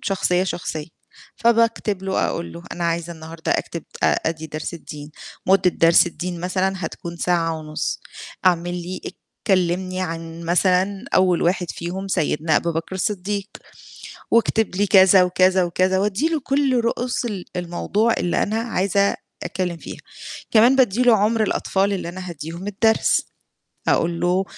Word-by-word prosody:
شخصية، 185 Hz, -2 st, +1 dB
شخصية، 170 Hz, -4 st, -4 dB, 0.5 s
فباكتب 230 Hz, -4 st, +2 dB
له 190 Hz, 0 st, 0 dB
أقول 170 Hz, -, -4 dB
له 170 Hz, -, -9 dB
أنا 175 Hz, -, -3 dB
عايزة 170 Hz, 0 st, -1 dB
النهارده 160 Hz, 0 st, -4 dB
أكتب 170 Hz, -, -3 dB, 0.2 s
آآ -, -, +3 dB
أدي 160 Hz, -1 st, -2 dB
درس 155 Hz, +2 st, -5 dB
الدين، 150 Hz, -3 st, -9 dB, 0.4 s
مدة 190 Hz, -1 st, +4 dB
درس 165 Hz, +1 st, +5 dB
الدين 175 Hz, 0 st, -5 dB
مثلًا 185 Hz, +2 st, 0 dB
هتكون 170 Hz, +1 st, -7 dB
ساعة 165 Hz, -2 st, 0 dB
ونُص، 155 Hz, 0 st, -3 dB, 0.5 s
اعمل 175 Hz, -1 st, +2 dB
لي 180 Hz, +1 st, -5 dB, 0.5 s
كلّمني 185 Hz, 0 st, +1 dB
عن 165 Hz, -1 st, -5 dB
مثلًا 185 Hz, +4 st, +2 dB
أول 185 Hz, -2 st, +3 dB
واحد 180 Hz, 0 st, 0 dB
فيهم 185 Hz, +3 st, -5 dB
سيدنا 160 Hz, -3 st, +1 dB
أبو 170 Hz, -, 0 dB
بكر 165 Hz, +3 st, -4 dB
الصديق، 200 Hz, +1 st, -2 dB, 0.8 s
واكتب 225 Hz, -3 st, +2 dB
لي 205 Hz, +2 st, +1 dB
كذا، 190 Hz, -1 st, +7 dB
وكذا، 185 Hz, +1 st, +3 dB
وكذا، 185 Hz, +2 st, +1 dB
وأدّي 210 Hz, +9 st, +1 dB
له 325 Hz, -2 st, 0 dB
كلّ 275 Hz, -1 st, +1 dB
رؤوس 240 Hz, +2 st, -1 dB
ال 200 Hz, -6 st, -4 dB
الموضوع 180 Hz, +6 st, 0 dB
اللي 175 Hz, -, +1 dB
أنا 215 Hz, +2 st, -1 dB
عايزة 200 Hz, -3 st, +1 dB, 0.3 s
أتكلّم 180 Hz, -2 st, -3 dB
فيها، -, -, -9 dB, 0.5 s
كمان 235 Hz, +4 st, +6 dB
بادّي 250 Hz, -4 st, +3 dB
له 240 Hz, -3 st, +6 dB
عُمر 215 Hz, +2 st, +2 dB
الأطفال 200 Hz, -1 st, 0 dB
اللي 180 Hz, -3 st, -3 dB
أنا 185 Hz, +1 st, -7 dB
هادّيهم 170 Hz, +3 st, -7 dB
الدرس، 220 Hz, +2 st, +2 dB, 0.7 s
أقول 170 Hz, 0 st, +1 dB
له 180 Hz, +2 st, +2 dB
185 Hz, 145 wpm, -22 LUFS, 170-200 Hz, 0.8 s, كذا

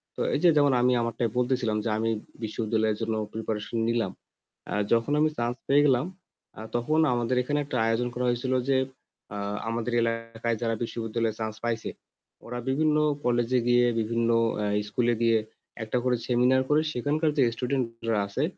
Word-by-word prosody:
তো -, -, -4 dB
এই -, -, +1 dB
যে 175 Hz, -, +7 dB
যেমন 145 Hz, -2 st, +4 dB
আমি 125 Hz, +1 st, +4 dB
আমারটাই 115 Hz, 0 st, -1 dB
বলতেছিলাম 125 Hz, -3 st, +1 dB
যে -, -, +1 dB
আমি 115 Hz, +1 st, 0 dB, 0.3 s
বিশ্ববিদ্যালয়ের 110 Hz, -1 st, 0 dB
জন্য 110 Hz, 0 st, -1 dB, 0.2 s
preparation 110 Hz, 0 st, -3 dB
নিলাম। 115 Hz, -5 st, 0 dB, 0.6 s
অ্যা -, -, -3 dB, 0.2 s
যখন 115 Hz, +4 st, +1 dB
আমি 155 Hz, -, +4 dB
chance 120 Hz, +1 st, -2 dB
পেয়ে 145 Hz, +1 st, +5 dB
গেলাম, 130 Hz, +2 st, +3 dB, 0.5 s
আ -, -, -6 dB
তখন 135 Hz, +7 st, +1 dB
আমাদের 120 Hz, +1 st, 0 dB
এখানে 145 Hz, +3 st, 0 dB
একটা 135 Hz, -, -3 dB
আয়োজন 115 Hz, +2 st, +1 dB
করা 125 Hz, +1 st, -2 dB
হয়েছিল 120 Hz, +2 st, 0 dB, 0.2 s
যে, 135 Hz, -, +4 dB, 0.6 s
আ -, -, -4 dB, 0.3 s
আমাদের 115 Hz, +1 st, -2 dB
এলাকায় 115 Hz, 0 st, -2 dB
যারা 115 Hz, -1 st, 0 dB
বিশ্ববিদ্যালয়ে 115 Hz, -1 st, -2 dB
chance 110 Hz, -1 st, -4 dB
পাইছে; 115 Hz, -1 st, -2 dB, 0.6 s
ওরা 120 Hz, +1 st, -5 dB
বিভিন্ন 150 Hz, +3 st, +2 dB, 0.3 s
কলেজে 120 Hz, +1 st, +2 dB
গিয়ে 120 Hz, 0 st, +5 dB
বিভিন্ন 115 Hz, +1 st, 0 dB, 0.3 s
অ্যা 105 Hz, -1 st, -1 dB, 0.2 s
স্কুলে 120 Hz, +2 st, +1 dB
গিয়ে 115 Hz, -1 st, +4 dB, 0.5 s
একটা 110 Hz, +3 st, -1 dB
করে 125 Hz, -1 st, +2 dB
seminar 125 Hz, +1 st, +3 dB
করে। 150 Hz, +1 st, +4 dB
সেখানকার 150 Hz, +5 st, 0 dB
যে 135 Hz, -, +5 dB
student 130 Hz, +1 st, 0 dB, 0.3 s
রা 110 Hz, -, +2 dB
আছে 115 Hz, +8 st, -2 dB
120 Hz, 170 wpm, -27 LUFS, 115-130 Hz, 0.6 s, যে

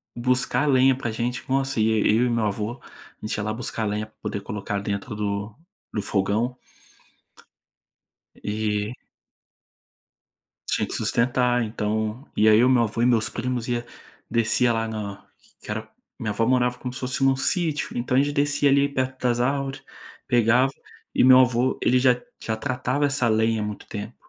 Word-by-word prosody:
buscar 125 Hz, +4 st, +1 dB
lenha 130 Hz, -1 st, +5 dB
pra 120 Hz, -4 st, -3 dB
gente, 120 Hz, +2 st, -3 dB
nossa, 135 Hz, -2 st, 0 dB
ia 110 Hz, 0 st, +3 dB
e 105 Hz, +1 st, +3 dB
eu 125 Hz, -, +3 dB
e -, -, 0 dB
meu 115 Hz, -2 st, +1 dB
avô, 105 Hz, +4 st, -3 dB
a -, -, -15 dB
gente -, -, -2 dB
ia 105 Hz, -, -3 dB
lá 110 Hz, 0 st, -2 dB
buscar 115 Hz, -1 st, -3 dB
lenha 105 Hz, +1 st, -2 dB
pra 110 Hz, -, -32 dB
poder 100 Hz, -, -4 dB
colocar 105 Hz, -1 st, -4 dB
dentro 100 Hz, +1 st, -4 dB
do 105 Hz, +1 st, -3 dB, 0.4 s
do 105 Hz, -, -1 dB
fogão. 110 Hz, +6 st, 0 dB, 1.8 s
E 105 Hz, +1 st, -2 dB, 1.8 s
Tinha -, -, 0 dB
que -, -, -6 dB
sustentar 125 Hz, 0 st, +1 dB
então, 110 Hz, +3 st, -3 dB
aí 105 Hz, -, +3 dB
eu 110 Hz, +4 st, +6 dB
e -, -, +4 dB
meu 120 Hz, -2 st, +4 dB
avô 115 Hz, +2 st, -2 dB
e -, -, +4 dB
meus 115 Hz, -2 st, +3 dB
primos 125 Hz, -1 st, -3 dB
ia 120 Hz, -1 st, -1 dB, 0.5 s
descia 115 Hz, +1 st, +2 dB
lá 115 Hz, 0 st, -1 dB
na 100 Hz, -2 st, -6 dB, 0.3 s
que -, -, -10 dB
era 110 Hz, +1 st, -4 dB, 0.3 s
minha 110 Hz, -4 st, -3 dB
avó 115 Hz, +2 st, 0 dB
morava 125 Hz, -1 st, +2 dB
como 125 Hz, 0 st, -5 dB
se -, -, -7 dB
fosse 130 Hz, +1 st, -3 dB
em -, -, +5 dB
um 135 Hz, -, +3 dB
sítio, 155 Hz, +1 st, -1 dB
então 125 Hz, +1 st, 0 dB
a -, -, +6 dB
gente 145 Hz, +1 st, 0 dB
descia 145 Hz, 0 st, +2 dB
ali 140 Hz, +1 st, +4 dB
perto 130 Hz, -1 st, -3 dB
das 120 Hz, -1 st, +1 dB
árvore, 135 Hz, +1 st, -1 dB, 0.5 s
pegava, 125 Hz, +2 st, +3 dB, 0.4 s
e -, -, +4 dB
meu 130 Hz, 0 st, +8 dB
avô 125 Hz, 0 st, +2 dB
ele 125 Hz, +1 st, +4 dB
já 125 Hz, -1 st, +3 dB, 0.2 s
já 110 Hz, 0 st, -2 dB
tratava 130 Hz, +3 st, -1 dB
essa 140 Hz, -4 st, +1 dB
lenha 110 Hz, 0 st, +2 dB
há -, -, -1 dB
muito 105 Hz, -1 st, -6 dB
tempo, 105 Hz, +2 st, -6 dB
120 Hz, 180 wpm, -24 LUFS, 110-130 Hz, 1.8 s, meu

